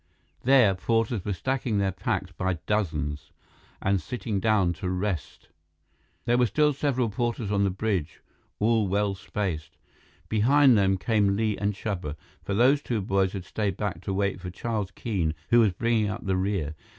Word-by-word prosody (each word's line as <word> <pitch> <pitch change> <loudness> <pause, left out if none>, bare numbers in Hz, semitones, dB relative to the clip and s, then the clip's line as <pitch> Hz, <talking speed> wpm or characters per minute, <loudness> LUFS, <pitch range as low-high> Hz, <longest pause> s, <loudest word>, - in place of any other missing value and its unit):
There, 125 -6 +5
porters 115 +2 0
were 105 - -2
stacking 125 +1 -1
their 100 -1 +1
packs 95 0 -2
by 95 0 -1
dozens 75 -7 -1 0.5
and 95 -1 +2
sitting 110 +1 -3
down 95 -4 +2
to 90 - -1
rest. 90 -4 -3 0.8
There 120 +1 +3
were 125 - +4
still 150 +7 +2
several 130 -5 0
porters 120 -1 -2
on 100 -1 +2
the - - +2
bridge, 95 -4 -2 0.4
all 110 -1 +2
well 100 +1 +1
spaced. 95 -5 -4 0.5
Behind 130 +4 +5
them 95 -2 +3
came 100 0 +2
Li 110 0 0
and 100 0 -1
Chuba, 95 -8 -4 0.3
for 100 - -2
those 130 +6 +4
two 120 -5 -2
boys 95 -1 +1
had 95 -3 -5
stayed 100 -4 -2
back 100 -5 -3
to 95 - -4
wait 100 -1 -1
for 90 - -5
Charles 105 +1 -3
Keene, 95 -7 -2 0.2
who 120 - +7
was 110 -4 +4
bringing 110 +2 +1
up 105 - -5
the 95 -1 +1
rear. 95 -5 -1
100 Hz, 170 wpm, -26 LUFS, 95-115 Hz, 0.8 s, who